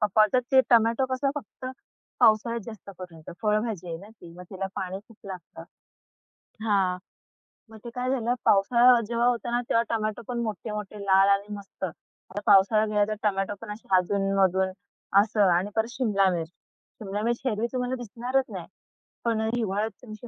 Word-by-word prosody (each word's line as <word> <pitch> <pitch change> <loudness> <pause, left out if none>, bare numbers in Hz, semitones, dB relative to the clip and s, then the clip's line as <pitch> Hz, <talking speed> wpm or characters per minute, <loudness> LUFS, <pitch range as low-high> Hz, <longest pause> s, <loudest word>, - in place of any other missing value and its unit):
पप्पा 210 - +4 0.2
बोलतात, 250 +4 +3
ते 265 - +8
टोमॅटो 230 +2 +4
कसं, 275 +1 0
फक्त 255 -1 -8 0.5
पावसाळ्यात 230 0 +4
जास्त 220 -3 -9
करून 175 -3 -10 0.2
फळभाजी 210 -4 0
आहे 165 - -4
ना 200 - -13
ती, 175 -6 -14
मग 180 - -9
तिला 195 -1 -3
पाणी 190 +1 -4
खूप 230 - -17
लागतं. 175 -3 -9 1.0
हां, 195 -4 +2 0.7
मग 220 - -12
ते 240 - -6
काय 250 +1 -2
झालं, 245 -2 +1
पावसाळा 235 +5 +5
जेव्हा 235 +1 +1
होता 240 -1 0
ना, 240 - +1
तेव्हा 230 - +3
टोमॅटो 215 -1 -2
पण 245 -1 -3
मोठे, 215 0 -4
मोठे 210 0 -6
लाल 195 0 +5
आणि 200 +1 +1
मस्त. 200 -1 -11
आता 185 +3 -10
पावसाळा 210 +1 +5
गेला, 210 -1 +2
तर 215 - -1
टोमॅटो 195 0 0
पण 225 -2 -7
असे 210 - -10
अधून-मधून 190 0 +1 0.5
असं. 215 0 0 0.2
आणि 190 +3 -2
परत 225 0 +1
शिमला 210 -7 +2
मिर्च, 165 -2 -3 0.5
शिमला 205 0 -3
मिर्च 235 +1 -1
हिरवी 225 -1 0
तुम्हाला 250 0 -1
दिसणारच 245 +3 -2
नाही, - - -6 0.6
पण 225 -2 +1
हिवाळ्यात 215 -1 -1
तुमची 215 0 -10
215 Hz, 170 wpm, -26 LUFS, 195-235 Hz, 1.0 s, ते